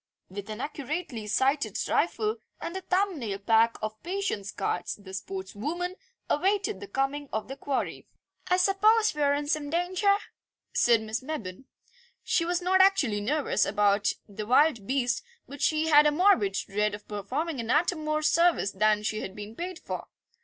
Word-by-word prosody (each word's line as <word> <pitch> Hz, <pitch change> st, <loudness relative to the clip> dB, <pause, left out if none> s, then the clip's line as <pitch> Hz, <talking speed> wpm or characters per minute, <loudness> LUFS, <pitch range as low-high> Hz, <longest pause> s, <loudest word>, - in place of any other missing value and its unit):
With 200 Hz, +2 st, -7 dB
an 215 Hz, +2 st, -5 dB
accurately 285 Hz, -5 st, -4 dB
sighted 270 Hz, +7 st, +1 dB
rifle 430 Hz, 0 st, 0 dB, 0.2 s
and 340 Hz, -, -5 dB
a 380 Hz, -, -3 dB
thumbnail 365 Hz, -, -1 dB
pack 225 Hz, +3 st, +3 dB
of 215 Hz, 0 st, -4 dB
patience 355 Hz, -, -3 dB
cards 175 Hz, -3 st, -2 dB
the 200 Hz, -2 st, -13 dB
sportswoman 205 Hz, -, -4 dB, 0.3 s
awaited 385 Hz, -, +1 dB
the 200 Hz, -, -8 dB
coming 275 Hz, +5 st, -2 dB
of 220 Hz, -, -3 dB
the 270 Hz, -, -6 dB
quarry. 275 Hz, -1 st, -3 dB, 0.4 s
"I 360 Hz, -, +3 dB
suppose 425 Hz, +4 st, +4 dB
we 300 Hz, -, -4 dB
are 285 Hz, 0 st, +3 dB
in 290 Hz, 0 st, -2 dB
some 290 Hz, -1 st, -1 dB
danger?" 365 Hz, +5 st, +2 dB, 0.6 s
said 235 Hz, -2 st, +4 dB
Miss 220 Hz, +2 st, -3 dB
Mebbin. 260 Hz, -7 st, -6 dB, 0.6 s
She 335 Hz, -, +1 dB
was 350 Hz, +1 st, -1 dB
not 375 Hz, +1 st, +4 dB
actually 285 Hz, -, +3 dB
nervous 290 Hz, +7 st, +1 dB
about 205 Hz, 0 st, +2 dB
the 210 Hz, +1 st, -7 dB
wild 255 Hz, -4 st, +3 dB
beast, 255 Hz, -1 st, 0 dB, 0.3 s
but 285 Hz, 0 st, -10 dB
she 315 Hz, 0 st, +2 dB
had 300 Hz, -1 st, +7 dB
a -, -, +4 dB
morbid 295 Hz, -, +3 dB
dread 205 Hz, +2 st, -1 dB
of 210 Hz, -, -14 dB
performing 260 Hz, -, -3 dB
an 230 Hz, -1 st, -4 dB
atom 310 Hz, +3 st, +2 dB
more 305 Hz, 0 st, -1 dB
service 335 Hz, -, +3 dB
than 210 Hz, +1 st, +2 dB
she 215 Hz, 0 st, -1 dB
had 190 Hz, -, -6 dB
been 210 Hz, +1 st, -8 dB
paid 360 Hz, +3 st, -5 dB
for. -, -, -6 dB
275 Hz, 165 wpm, -28 LUFS, 210-340 Hz, 0.6 s, had